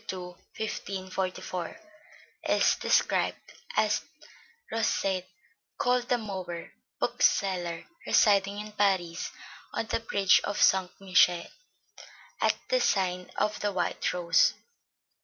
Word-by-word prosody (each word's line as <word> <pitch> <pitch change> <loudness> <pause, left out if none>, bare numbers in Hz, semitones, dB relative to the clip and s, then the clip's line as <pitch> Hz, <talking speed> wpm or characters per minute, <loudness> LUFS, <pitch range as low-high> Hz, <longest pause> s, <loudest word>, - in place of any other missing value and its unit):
2, 190 - -4 0.4
1544, 190 - -4 0.7
is - - +4
described - - +1 0.2
as - - +3 0.7
"Rosset 195 -4 0 0.5
called 245 0 +1
the 245 - +3
Mower, 185 -6 -6 0.3
bookseller, 175 -4 +1 0.2
residing 200 -1 +4
in 210 0 -7
Paris, 190 -5 0 0.5
on 225 - -1
the 220 - -1
bridge 200 -4 +3
of 205 - -2
St. 190 -1 +4
Michael, 180 -2 +4 1.0
at - - +3
the - - +3
sign 180 -2 0
of 210 0 0
the 205 - 0
White 180 -3 -1
Rose." 170 -2 +3
190 Hz, 100 wpm, -28 LUFS, 180-210 Hz, 1.0 s, is